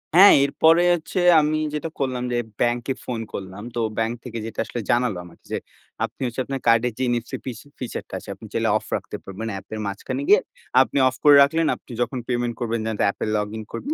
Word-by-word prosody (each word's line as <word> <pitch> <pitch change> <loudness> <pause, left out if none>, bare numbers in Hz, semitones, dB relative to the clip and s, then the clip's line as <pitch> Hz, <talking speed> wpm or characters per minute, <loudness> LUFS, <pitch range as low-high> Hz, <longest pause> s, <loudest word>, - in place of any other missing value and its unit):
হ্যাঁ, 195 +3 +10
এরপরে 165 +4 +4
হচ্ছে 175 +3 -2 0.2
আমি 155 +1 +1 0.2
যেটা 150 +2 -3
করলাম, 130 -2 -1
যে 120 - +1 0.2
ব্যাংকে 120 +2 +1
ফোন 120 -2 -3
করলাম, 95 +1 -6
তো 120 - -1 0.2
ব্যাংক 115 +1 0
থেকে 115 -2 -6
যেটা 115 - -7
আসলে 120 - -5
জানালো 120 -6 +2
আমাকে 85 - -17
যে - - 0 0.5
আপনি - - -13
হচ্ছে 125 +1 -2
আপনার 135 -1 -3
কার্ডের 115 0 +4
যে 130 - -1
NFC 120 -1 -3
ফিস 120 -4 -5 0.2
ফিচার 125 - -4
টা - - -16
আছে - - -13
আপনি - - -13
চাইলে - - +1
অফ - - -10
রাখতে - - -5
পারবেন, 100 +4 -6
অ্যাপের 110 +3 -6
মাঝখানে 100 - -4
গিয়ে 420 - +8 0.4
আপনি - - 0
অফ 130 - -1
করে 145 -1 +8
রাখলেন, 160 +3 +1
আপনি - - -16
যখন 130 +1 -1
পেমেন্ট 120 -1 -1
করবেন, 115 -1 -1
যে - - -1 0.2
অ্যাপে 100 - -2
লগ 105 - -1
ইন 110 - -5
করবেন। 290 +4 -3
120 Hz, 210 wpm, -23 LUFS, 115-140 Hz, 0.5 s, হ্যাঁ